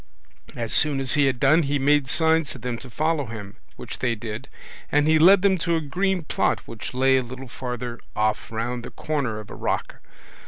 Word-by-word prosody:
As 115 -2 -3
soon 145 -2 +4
as 130 -1 +2
he 145 -2 +4
had 130 -2 -1
done 145 +6 +5
he 145 -1 0
made 145 0 +3
signs 160 0 +2
to - - -5
them 125 0 -4
to 130 - -11
follow 155 +1 -1
him, 105 -3 -8 0.2
which - - -8
they 120 -2 0
did, 110 0 -7 0.4
and 145 +1 +3
he 160 0 +4
led 185 +4 +7
them 190 -2 +3
to 170 +1 0
a - - +1
green 180 +5 -1
plot - - 0
which 115 +2 -7
lay 130 +1 +4
a - - +2
little 130 +2 -9
farther 125 -1 -5 0.2
off 110 +1 -1
round 120 +2 -3
the - - -7
corner 135 -8 -3
of 105 - -11
a - - -7
rock. - - -3
135 Hz, 210 wpm, -24 LUFS, 120-155 Hz, 0.4 s, led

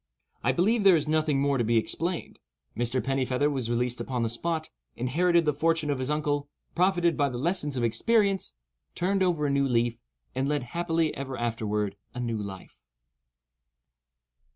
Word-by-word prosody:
I - - +3
believe 210 +5 +2
there 195 -3 +7
is 155 -2 0
nothing 155 -2 +2
more 140 -1 +1
to - - +2
be 115 +1 +2
explained. 170 +9 -2 0.4
Mr. 120 +2 0
Pennifeather 135 +1 +1
was 130 -5 -2
released 120 +1 0
upon 125 -3 -2
the 115 - 0
spot, 160 +7 -3 0.2
inherited 170 +7 +2
the 150 - +2
fortune 160 0 +1
of 140 - -1
his 130 +1 -2
uncle, 145 -1 -1 0.2
profited 175 -2 +2
by 145 -2 +2
the 125 - -5
lessons 150 -1 0
of 120 - 0
experience, 195 - +1 0.4
turned 190 +2 0
over 170 -5 +2
a 140 - +1
new 140 0 +2
leaf, 120 -2 +1 0.3
and 135 +2 -1
led 145 -3 0
happily 165 +3 0
ever 135 -1 -5
afterward 105 -3 -2 0.2
a - - -4
new 115 -3 -2
life. 95 -2 -9
140 Hz, 170 wpm, -27 LUFS, 120-165 Hz, 0.4 s, there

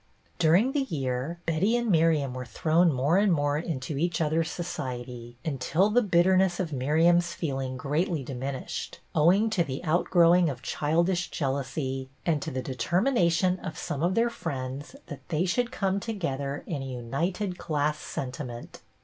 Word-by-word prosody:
During 180 +10 +4
the 285 - +1
year, 135 - -2
Betty 180 +8 +2
and 235 -3 0
Miriam 160 -5 +3
were 130 0 -5
thrown 160 +8 +2
more 145 +7 +2
and 205 -1 +3
more 145 -2 +1
into 145 -3 -4
each 175 +2 0
other's 160 +1 +1
society, 125 -7 -6
until 160 +7 +1
the 245 +3 +4
bitterness 185 -2 +3
of 170 -5 -2
Miriam's 165 +6 +3
feel 140 -5 -2
ing 130 -1 -4
greatly 150 +3 -1
diminished, 130 +1 -5
owing 180 +8 +4
to 185 -5 +2
the 135 -1 -5
out 170 +1 +1
growing 175 -1 +5
of 130 -2 -6
childish 170 +4 0
jealousy 135 -1 -2 0.2
and 155 -4 +1
to 160 - -3
the 130 -3 -3
determination 180 - +1
of 160 - -6
some 150 -5 -4
of 175 +3 +1
their 235 +1 +2
friends 140 - -5
that - - -10
they 165 +2 +1
should 240 +7 0
come 195 -5 0
together 145 -10 -3
in 150 -5 -3
a - - -5
united 165 - -3
class 150 0 -1
sentiment. 125 -2 -6
160 Hz, 160 wpm, -27 LUFS, 135-180 Hz, 0.2 s, growing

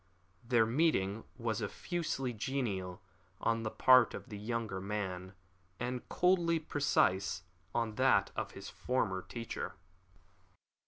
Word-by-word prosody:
Their 115 -1 +4
meeting 115 - +1
was 115 -2 -1
effusively 135 - -2
genial 105 -7 -2 0.4
on 115 0 +1
the 110 - -2
part 125 +1 +6
of - - -8
the 105 - -6
younger 110 -3 -2
man, 95 -2 -4 0.4
and 125 +1 -3
coldly 175 -2 +3
precise 120 - +1 0.3
on 115 -2 0
that - - +4
of - - -3
his - - -8
former 110 -7 -1
teacher. 110 -6 -5
115 Hz, 115 wpm, -34 LUFS, 100-130 Hz, 0.4 s, part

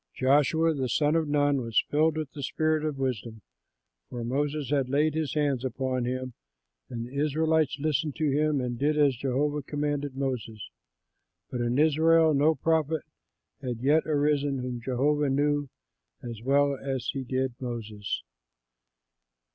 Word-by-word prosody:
Joshua 150 +5 +3
the 130 -4 -2
son 150 +5 +2
of 160 -2 +1
Nun 145 -2 +2
was 115 -2 +1
filled 155 +1 +2
with 155 -3 -4
the 145 - -8
spirit 155 +2 0
of 155 -3 -2
wisdom, 115 -5 -3 0.7
for 120 -1 -5
Moses 140 +3 -2
had 135 -3 +1
laid 150 +3 +2
his 155 -2 -2
hands 140 -4 +1
upon 130 0 -2
him; 130 0 -3 0.6
and 115 -1 -5
the 125 - -12
Israelites 155 0 +1
listened 150 0 -1
to 155 -3 0
him 150 0 +1
and 120 -2 -3
did 150 +2 +1
as 145 -3 +4
Jehovah 140 +4 -1
commanded 145 -1 -3
Moses. 125 -6 -4 0.8
But 125 - -2
in 120 +1 0
Israel 160 +1 +4
no 150 +3 +3
prophet 160 +1 0 0.6
had 125 -3 -4
yet 150 +4 +3
arisen 145 -2 +1
whom 125 -1 -4
Jehovah 140 +4 +1
knew 145 +1 +1 0.5
as 115 -3 -7
well 140 +2 +2
as 135 -1 -4
he 135 - -3
did 130 0 -1
Moses. 110 -5 -4
140 Hz, 150 wpm, -27 LUFS, 130-150 Hz, 0.8 s, as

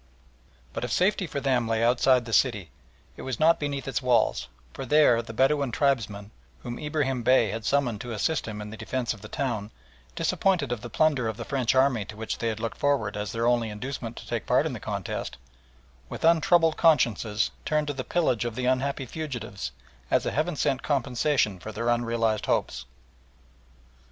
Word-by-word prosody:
But - - -4
if - - -3
safety 185 0 +2
for 140 - -3
them 130 -4 +1
lay 115 0 0
outside 125 +1 +3
the 115 - -6
city, 105 - +2 0.4
it - - -10
was 130 -4 -4
not 165 +2 +4
beneath 140 -3 -3
its 135 - -1
walls, 115 - +2 0.3
for - - -6
there 130 -3 +4
the 115 - -9
Bedouin 135 +2 +2
tribesmen, 110 -6 0 0.3
whom 120 -1 -5
Ibrahim 145 -4 -1
Bey 120 -3 +4
had 110 0 -5
summoned 125 -7 +1
to 120 - -6
assist 115 +8 -1
him 105 -1 -5
in 105 0 -7
the 110 - -8
defence 120 +3 -2
of 105 - -13
the 105 - -9
town, 115 -7 -3 0.5
disappointed 175 -10 +1
of 120 -3 -2
the 120 - -7
plunder 140 -2 +2
of 110 -1 -3
the 115 - -6
French 130 -3 0
army 130 -4 +3
to 105 - -10
which 110 0 -4
they 115 - -1
had 110 -1 -2
looked 115 0 -4
forward 135 -9 +1
as 105 -1 -3
their 115 0 -1
only 120 -2 +2
inducement 115 +2 -5
to - - -9
take - - -3
part - - +3
in - - -2
the - - -6
contest, - - -4 0.7
with - - -4
untroubled 165 0 +4
consciences 120 - +2
turned 150 -1 0
to 145 - -3
the 130 -1 -4
pillage 145 -10 +1
of 120 -2 -4
the 125 0 -2
unhappy 130 +1 0
fugitives 115 - -5 0.4
as - - +2
a - - 0
heaven 155 +4 -1
sent 135 -2 0
compensation 130 -6 0
for 110 - -7
their 115 +3 -2
unrealised 115 -2 0
hopes. - - -1
125 Hz, 195 wpm, -26 LUFS, 110-140 Hz, 0.7 s, not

